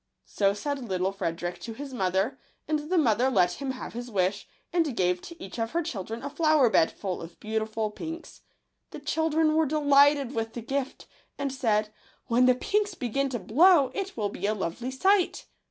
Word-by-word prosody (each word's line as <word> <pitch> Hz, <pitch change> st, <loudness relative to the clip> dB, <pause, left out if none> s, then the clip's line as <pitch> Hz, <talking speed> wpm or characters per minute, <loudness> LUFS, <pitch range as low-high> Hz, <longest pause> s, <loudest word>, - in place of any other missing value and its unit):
— -, -, -53 dB
So 200 Hz, -1 st, +1 dB
said 285 Hz, +6 st, -3 dB
little 185 Hz, 0 st, 0 dB
Frederick 175 Hz, -2 st, -4 dB
to 230 Hz, -, -7 dB
his 275 Hz, +3 st, -8 dB
mother; 195 Hz, +4 st, 0 dB, 0.3 s
and 305 Hz, 0 st, -1 dB
the 370 Hz, -, +2 dB
mother 250 Hz, -4 st, +3 dB
let 180 Hz, -3 st, +2 dB
him 275 Hz, -, -2 dB
have 260 Hz, -1 st, -6 dB
his 240 Hz, +1 st, -6 dB
wish, 195 Hz, -1 st, 0 dB, 0.3 s
and 325 Hz, -8 st, +1 dB
gave 180 Hz, -1 st, +1 dB
to 335 Hz, -, -11 dB
each 195 Hz, +5 st, -8 dB
of 225 Hz, +3 st, -2 dB
her 340 Hz, +1 st, +1 dB
children 225 Hz, -2 st, -5 dB
a 285 Hz, -, -3 dB
flower 305 Hz, -5 st, +3 dB
bed 160 Hz, -, +4 dB
full 190 Hz, -3 st, -5 dB
of 165 Hz, +1 st, -10 dB
beautiful 220 Hz, 0 st, -2 dB
pinks. 325 Hz, +9 st, -8 dB, 0.5 s
The -, -, -8 dB
children 315 Hz, +1 st, +1 dB
were 315 Hz, -1 st, +3 dB
delighted 285 Hz, -2 st, +4 dB
with 225 Hz, -1 st, -3 dB
the 240 Hz, -, -5 dB
gift, 270 Hz, +3 st, -3 dB, 0.3 s
and 280 Hz, -1 st, -2 dB
said, 215 Hz, -5 st, 0 dB, 0.2 s
" -, -, -34 dB
When 245 Hz, +2 st, +4 dB
the 255 Hz, -, +5 dB
pinks 410 Hz, +6 st, 0 dB
begin 275 Hz, +1 st, -1 dB
to 250 Hz, -, -2 dB
blow, 275 Hz, -, +5 dB
it 390 Hz, -5 st, -4 dB
will 210 Hz, -2 st, 0 dB
be 200 Hz, -, -3 dB
a 215 Hz, -, +1 dB
lovely 200 Hz, +6 st, -3 dB
sight 375 Hz, +8 st, +2 dB
255 Hz, 200 wpm, -27 LUFS, 210-300 Hz, 0.5 s, the